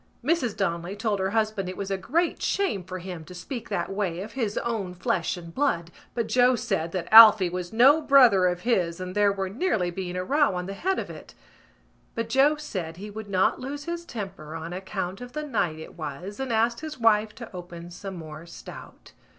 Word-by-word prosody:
Mrs 260 Hz, -9 st, +1 dB
Donnelly 175 Hz, -1 st, -2 dB
told 205 Hz, -1 st, -1 dB
her 190 Hz, 0 st, 0 dB
husband 215 Hz, -3 st, 0 dB
it 185 Hz, -, -7 dB
was 200 Hz, 0 st, -4 dB
a -, -, +2 dB
great 330 Hz, -, 0 dB
shame 380 Hz, -, 0 dB
for 185 Hz, +1 st, -6 dB
him 180 Hz, -2 st, -7 dB
to 180 Hz, -, -11 dB
speak 230 Hz, +8 st, -6 dB
that 200 Hz, -, -2 dB
way 190 Hz, -3 st, -2 dB
of 210 Hz, +3 st, -7 dB
his 225 Hz, -6 st, -2 dB
own 205 Hz, -6 st, -2 dB
flesh 175 Hz, 0 st, -1 dB
and 170 Hz, -1 st, -10 dB
blood 170 Hz, -12 st, 0 dB, 0.2 s
but 235 Hz, -2 st, 0 dB
Joe 250 Hz, +2 st, +4 dB
said 165 Hz, -7 st, -2 dB
that 180 Hz, -2 st, -3 dB
Alphy 215 Hz, -5 st, +9 dB
was 180 Hz, -1 st, -4 dB
no 270 Hz, +7 st, +6 dB
brother 250 Hz, -11 st, +6 dB
of 180 Hz, 0 st, -1 dB
his 180 Hz, -8 st, 0 dB
and 185 Hz, 0 st, -5 dB
there 205 Hz, 0 st, +3 dB
was 195 Hz, -1 st, -3 dB
nearly 215 Hz, -, 0 dB
being 180 Hz, 0 st, -5 dB
a 180 Hz, -, -2 dB
row 285 Hz, -1 st, +2 dB
on 180 Hz, 0 st, -3 dB
the 195 Hz, -, -5 dB
head 375 Hz, -, -1 dB
of -, -, -4 dB
it. -, -, -12 dB, 0.8 s
But 230 Hz, -1 st, -3 dB
Joe 275 Hz, +5 st, +4 dB
said 185 Hz, -, -5 dB
he 205 Hz, +3 st, -8 dB
would 215 Hz, 0 st, -8 dB
not 190 Hz, -1 st, +2 dB
lose 285 Hz, +3 st, -5 dB
his 340 Hz, +2 st, -4 dB
temper 195 Hz, -, -7 dB
on 165 Hz, +2 st, -6 dB
account 190 Hz, +2 st, -4 dB
of 245 Hz, 0 st, -9 dB
the 300 Hz, 0 st, -3 dB
night 215 Hz, -, -1 dB
it 160 Hz, -, -10 dB
was 170 Hz, -, -6 dB
and 265 Hz, -2 st, -3 dB
asked 230 Hz, +1 st, +2 dB
his 310 Hz, -3 st, -7 dB
wife 215 Hz, -2 st, +3 dB
to 230 Hz, -5 st, -10 dB
open 175 Hz, -1 st, -9 dB
some 190 Hz, +2 st, -7 dB
more 160 Hz, -1 st, -9 dB
stout. 170 Hz, -, -11 dB
200 Hz, 215 wpm, -26 LUFS, 180-240 Hz, 0.8 s, Alphy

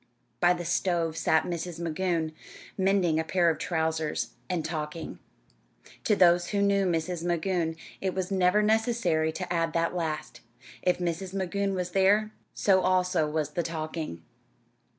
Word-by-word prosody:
By 175 Hz, 0 st, +5 dB
the 175 Hz, -1 st, -5 dB
stove 170 Hz, -2 st, 0 dB
sat 160 Hz, -1 st, +2 dB
Mrs. 170 Hz, -1 st, -4 dB
Magoon, 170 Hz, -1 st, -1 dB, 0.4 s
mending 190 Hz, -4 st, +2 dB
a -, -, +1 dB
pair 175 Hz, 0 st, +2 dB
of -, -, -5 dB
trousers 160 Hz, -2 st, -1 dB, 0.2 s
and 175 Hz, -4 st, -1 dB
talking. 160 Hz, 0 st, -5 dB, 0.9 s
To 210 Hz, -, +4 dB
those 175 Hz, -2 st, +5 dB
who 200 Hz, +1 st, 0 dB
knew 200 Hz, -1 st, +3 dB
Mrs. 170 Hz, 0 st, -1 dB
Magoon, 170 Hz, -1 st, 0 dB, 0.3 s
it 190 Hz, -1 st, -1 dB
was 190 Hz, 0 st, -2 dB
never 190 Hz, +2 st, +3 dB
necessary 220 Hz, -7 st, +2 dB
to 180 Hz, +1 st, -4 dB
add 165 Hz, -1 st, 0 dB
that 170 Hz, +1 st, 0 dB
last 160 Hz, -3 st, -3 dB, 0.4 s
if 180 Hz, -, +2 dB
Mrs. 180 Hz, +2 st, -3 dB
Magoon 195 Hz, +1 st, -1 dB
was 180 Hz, -1 st, -3 dB
there, 205 Hz, +3 st, +3 dB, 0.2 s
so 190 Hz, -2 st, +3 dB
also 185 Hz, -4 st, +2 dB
was 150 Hz, -1 st, -1 dB
the 175 Hz, -, -1 dB
talking. 155 Hz, -, -5 dB
175 Hz, 150 wpm, -28 LUFS, 160-190 Hz, 0.9 s, By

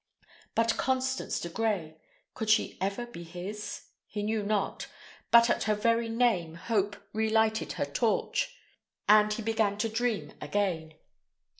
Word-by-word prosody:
But 230 Hz, 0 st, +2 dB
Constance 260 Hz, 0 st, 0 dB
de -, -, -4 dB
Grey 180 Hz, -5 st, -1 dB, 0.4 s
could 220 Hz, -, -3 dB
she 220 Hz, -, +3 dB
ever 200 Hz, +5 st, -1 dB
be 240 Hz, -8 st, -10 dB
his? 180 Hz, +5 st, -6 dB, 0.2 s
He 205 Hz, 0 st, -4 dB
knew 215 Hz, +1 st, 0 dB
not; 205 Hz, -1 st, -1 dB, 0.4 s
but 235 Hz, 0 st, +7 dB
at -, -, +1 dB
her 215 Hz, -, +2 dB
very 230 Hz, +2 st, +1 dB
name 225 Hz, -9 st, +1 dB
Hope 205 Hz, +2 st, 0 dB, 0.2 s
relighted 220 Hz, 0 st, +1 dB
her -, -, -1 dB
torch, -, -, 0 dB, 0.5 s
and 210 Hz, 0 st, +6 dB
he 215 Hz, +1 st, -2 dB
began 220 Hz, -2 st, +1 dB
to 225 Hz, +2 st, 0 dB
dream 220 Hz, -9 st, -1 dB
again. 160 Hz, -1 st, -1 dB
215 Hz, 140 wpm, -29 LUFS, 200-225 Hz, 0.5 s, but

